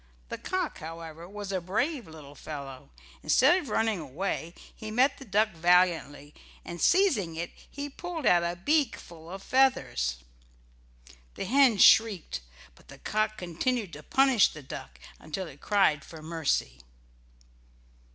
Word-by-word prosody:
The - - -5
cock, 370 -3 -3
however, 165 +1 -9
was 205 -1 -6
a 190 -2 -1
brave 235 - -2
little 155 -3 -12
fellow. 140 - -9 0.3
Instead 295 +9 +4
of 295 - -8
running 220 -3 +1
away 165 +3 -4 0.2
he 215 - -8
met 255 +6 +2
the 270 - -10
duck 215 +1 +2
valiantly, 170 -5 +1 0.3
and 175 0 -7
seizing 285 - +3
it 170 +2 -4 0.2
he 285 0 -5
pulled 325 +1 -6
out 175 -1 +5
a 170 0 -2
beakful 185 - -1
of 195 +2 -8
feathers. 255 - +1 1.2
The - - -4
hen 260 0 +4
shrieked, 200 - +4 0.3
but - - -23
the - - -12
cock 215 0 -1
continued 185 +3 -2
to 150 - -8
punish 265 - +4
the 155 - -11
duck 65 - -9 0.2
until 160 +5 -5
it 145 -4 -13
cried 190 -8 +2
for 160 -2 -12
mercy. 155 - -1
185 Hz, 140 wpm, -28 LUFS, 160-240 Hz, 1.2 s, out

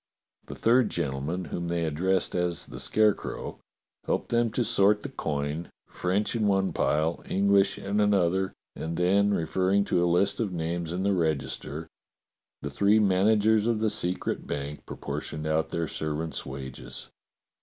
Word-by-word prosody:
The - - -7
third 120 -1 +3
gentleman, 80 +3 -2
whom 85 0 -2
they 85 -1 0
addressed 90 +4 0
as 90 -1 -1
the - - -9
Scarecrow, 110 -2 0 0.5
helped - - -1
them 120 0 +2
to 120 - +1
sort 105 0 +3
the 140 - -4
coin, 75 - -3 0.2
French 95 +6 -1
in 110 -3 +1
one 95 -1 +2
pile, 80 +3 +1
English 100 0 +3
in 100 +1 -2
another, 95 -2 +2 0.2
and 80 +1 -4
then 100 +3 +3
referring 95 +2 +1
to 90 - +2
a 90 - +2
list 100 +3 +2
of 110 -5 -1
names 85 -1 -3
in 90 +2 -2
the 100 0 +2
register, 80 -2 -2 0.8
the 70 - -3
three 100 +8 +4
managers 105 +2 +3
of 115 -2 +1
the 110 -1 +1
secret 90 -2 0
bank 70 +1 -5
proportioned 75 0 -5
out 80 +1 0
their 85 -1 -2
servants' 80 +1 -3
wages. 65 -1 -7
90 Hz, 155 wpm, -27 LUFS, 80-100 Hz, 0.8 s, three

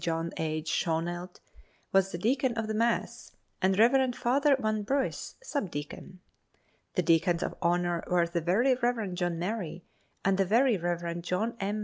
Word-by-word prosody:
John 165 0 -1
H. 155 0 -2
Schoenelt 175 +3 -2 0.5
was 195 0 +3
the - - -4
deacon 250 +5 +1
of 225 - -1
the 215 - -3
mass, 230 +2 -1 0.3
and 190 0 +2
Rev. 245 +3 +4
Father 275 +4 +3
Van 215 -4 -1
Briss 265 +6 -2
sub 285 - -2
deacon. 170 +5 -7 0.7
The 180 - +2
deacons 170 +1 +3
of - - -3
honor 175 0 +1
were 175 -1 +3
the 170 0 -2
Very 210 +11 +3
Rev. 240 -6 -1
John 175 -1 -1
Murray 180 -2 -4 0.4
and 195 0 +2
the 195 - +4
Very 235 +5 +4
Rev. 170 -1 -2
John 205 +7 -1
M. 205 +2 -2
185 Hz, 160 wpm, -29 LUFS, 170-230 Hz, 0.7 s, Rev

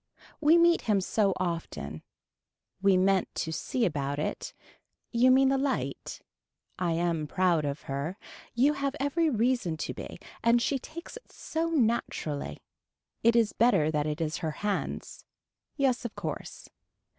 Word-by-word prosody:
We 315 +2 +6
meet 340 0 +5
him 205 -2 +4
so 200 +1 +1
often. 165 - -4 0.8
We 195 -1 +5
meant 190 0 +3
to 160 - -2
see 235 +9 -1
about 145 -4 -1
it. 150 - -3 0.6
You 245 +2 +4
mean 265 +1 +5
the 270 0 +2
light. 275 -1 -2 0.6
I 175 -2 +1
am 165 -2 0
proud 175 -2 +2
of 140 0 -3
her. 140 +7 -4 0.4
You 270 +5 +4
have 280 -1 -2
every 310 +4 +1
reason 235 - +1
to - - -4
be - - -8 0.3
and 235 +1 +5
she 270 +3 0
takes 335 - -9
it - - -17
so 325 +1 -2
naturally. 230 - -1 0.6
It 230 +1 +4
is 230 -3 +3
better 210 -10 +3
that 150 -1 0
it 150 +1 -2
is 160 0 -1
her 160 +5 -4
hands. 205 -1 -3 0.5
Yes 265 -4 +1
of 235 - -5
course. - - -6
210 Hz, 150 wpm, -29 LUFS, 160-265 Hz, 0.8 s, We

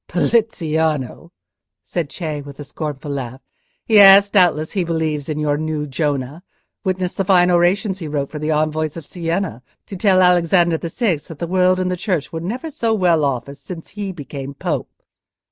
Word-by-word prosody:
"Poliziano?" 160 - 0 0.5
said 170 -5 -3
Cei, 155 -4 -4
with 140 0 -12
a - - -5
scornful 150 0 -6
laugh. 130 -2 -5 0.5
"Yes, 200 -2 +7
doubtless 170 -6 +3
he 190 -4 0
believes 160 -3 -2
in 150 - -2
your 150 -1 0
new 155 -1 -2
Jonah; 145 +1 -2 0.4
witness 185 -2 -1
the 195 - -1
fine 180 -1 +4
orations 185 +3 +2
he 165 - -5
wrote 145 -2 -3
for 150 - -6
the 150 +1 -3
envoys 155 0 0
of 165 - -8
Sienna, 170 - -3 0.2
to 200 - -8
tell 185 -1 +3
Alexander 175 -1 +3
the 170 - -5
Sixth 180 - -1
that 165 - -9
the 170 - -3
world 185 +1 +2
and 185 0 -1
the - - 0
Church 180 -5 -2
were 160 - -4
never 245 - -4
so 230 -5 0
well 175 -6 +2
off 135 -3 -1
as 140 0 -10
since 165 +3 -9
he 205 -1 -5
became 140 -4 -8
Pope." - - -3
165 Hz, 180 wpm, -19 LUFS, 150-185 Hz, 0.5 s, Yes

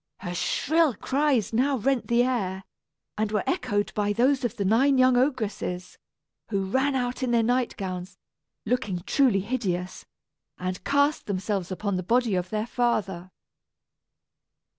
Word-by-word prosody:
Her 175 -2 -4
shrill 280 - +1
cries 270 -3 0
now 265 +4 +2
rent 260 +2 0
the 235 0 +3
air, 195 -7 -1 0.6
and 215 -1 0
were 210 -2 0
echoed 205 0 -1
by 205 -1 0
those 260 +5 +2
of 240 - -2
the 200 - -1
nine 260 +7 +4
young 255 0 +5
ogresses, 215 -8 -1 0.5
who 195 -3 -1
ran 265 +8 +1
out 245 0 -2
in 255 - 0
their 235 -1 +3
night 245 +1 0
gowns, 185 -1 -5 0.5
looking 210 -6 -1
truly 245 -8 +3
hideous, 190 -5 -3 0.5
and 185 0 -4
cast 285 +2 +1
themselves 195 -1 -2
upon 190 +1 -2
the - - -1
body 235 +3 +1
of 180 -1 -1
their 215 +1 -1
father. 200 -7 -1
220 Hz, 145 wpm, -26 LUFS, 190-255 Hz, 0.6 s, young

